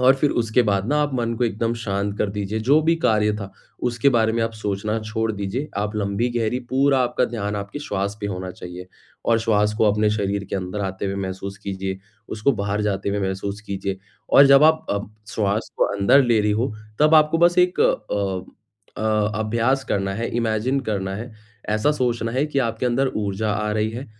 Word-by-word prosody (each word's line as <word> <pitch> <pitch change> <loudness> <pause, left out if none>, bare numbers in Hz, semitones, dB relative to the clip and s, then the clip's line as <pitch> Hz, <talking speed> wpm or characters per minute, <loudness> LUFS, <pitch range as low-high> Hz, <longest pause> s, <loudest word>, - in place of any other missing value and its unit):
और 130 +1 +6
फ़िर 145 +1 +2
उसके 115 +1 +2
बाद 100 -1 0
ना 150 - +2
आप 145 -2 -2
मन 115 -2 -1
को 125 - +2
एकदम 115 +1 -1
शांत 100 -1 -2
कर 105 - 0
दीजिए, 105 +1 -3
जो 140 +7 +4
भी 165 +2 +3
कार्य 105 -1 +3
था, 100 -2 -7 0.3
उसके 120 +3 +2
बारे 110 -2 +2
में 115 0 0
आप 115 0 -1
सोचना 105 0 -2
छोड़ 110 +1 -2
दीजिए। 105 +8 -3
आप 105 +1 -2
लंबी-गहरी 115 +4 0
पूरा 135 +1 +3
आपका 125 0 +1
ध्यान 105 -3 -3
आपके 100 +7 -5
श्वास 100 -6 -3
पे 100 - -2
होना 95 -2 -4
चाहिए, 90 0 -9 0.4
और 115 -1 +4
श्वास 105 -2 +2
को - - +4
अपने 105 +1 +2
शरीर 100 -1 -1
के - - -1
अंदर 95 +2 -4
आते 95 +1 -3
हुए 95 - -2
महसूस 100 0 -5
कीजिए, 95 -1 -4 0.3
उसको 110 +6 +1
बाहर 100 -2 -2
जाते 100 -1 -1
हुए 100 +1 -1
महसूस 100 +2 -3
कीजिए, 95 -1 -3 0.3
और 140 - +8
जब 140 +1 +7
आप 160 0 +4
अ, 100 - +1 0.3
श्वास 105 +1 -1
को - - +3
अंदर 100 +8 +5
ले 120 -3 +3
रही 105 0 +1
हों। 110 +4 0 0.3
तब 155 +1 +5
आपको 155 +1 +5
बस 175 +1 +4
एक 180 0 +3
अ - - +6 1.2
अ, 110 -1 +1
अभ्यास 115 +5 +1
करना 95 -1 -1
है, 115 +3 -2
इमेजिन 115 +4 0
करना 95 -2 -2
है, 115 +4 -7 0.4
ऐसा 110 +7 +2
सोचना 120 -5 -1
है 130 +4 +1
कि 145 -2 -1
आपके 115 -1 -1
अंदर 130 +2 +1
ऊर्जा 105 +1 -1
आ 105 0 -1
रही 110 0 0
है, 120 +5 -6
110 Hz, 205 wpm, -22 LUFS, 100-120 Hz, 1.2 s, और